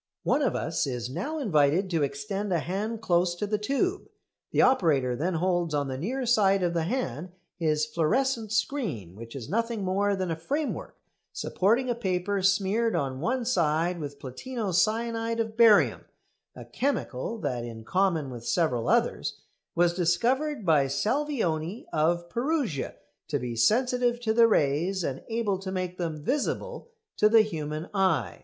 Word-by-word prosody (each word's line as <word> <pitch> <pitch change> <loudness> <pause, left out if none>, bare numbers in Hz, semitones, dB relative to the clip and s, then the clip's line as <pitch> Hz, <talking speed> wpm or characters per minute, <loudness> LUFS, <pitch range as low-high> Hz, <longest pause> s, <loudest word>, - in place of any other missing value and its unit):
One 295 - +2
of 270 - +1
us 160 -1 -1
is 125 -2 -4
now 195 - -3
invited 170 - +2
to 165 -2 +1
extend 195 +9 -2
a 175 - +3
hand 210 +7 -3
close 175 -2 +2
to 190 - -2
the 210 0 -1
tube. 360 - -1 0.4
The - - +3
operator 145 - +3
then 170 +7 -1
holds 175 -2 0
on 145 -1 -1
the 130 - -3
near 250 - -2
side 195 -5 +3
of 175 -1 +1
the 165 -1 0
hand 175 - -3 0.3
his 155 -2 +1
fluorescent 220 - 0
screen, 210 - -2
which 115 +3 -10
is 125 -5 -6
nothing 230 +2 -1
more 200 +2 +1
than 185 -3 -2
a - - 0
framework 285 - -3 0.4
supporting 230 +7 +1
a 245 - +1
paper 195 -3 -1
smeared 195 +4 +2
on 130 -2 -2
one 245 - -1
side 170 -5 +1
with 145 -2 -6
platino 195 - -5
cyanide 230 +4 +1
of 220 -1 -2
barium, 225 -3 +5 0.5
a - - -9
chemical 230 - -2
that, 125 - -3
in 115 -1 -8
common 170 - 0
with 120 -2 -8
several 125 -6 0
others, - - +1 0.4
was 175 0 +3
discovered 230 - +1
by 150 -5 +4
Salvioni 210 - -1
of 170 +2 +1
Perugia 240 - -1 0.3
to 145 - 0
be 125 -3 -4
sensitive 245 - +2
to 220 -2 +1
the 230 0 +6
rays 175 +1 +1
and 135 -4 -3
able 225 -4 0
to 190 -1 -5
make 185 -1 -3
them 160 -4 -3
visible 465 - -2 0.3
to 210 - +5
the 225 0 +7
human 155 -4 -4
eye. 165 - +1
185 Hz, 160 wpm, -27 LUFS, 155-230 Hz, 0.5 s, the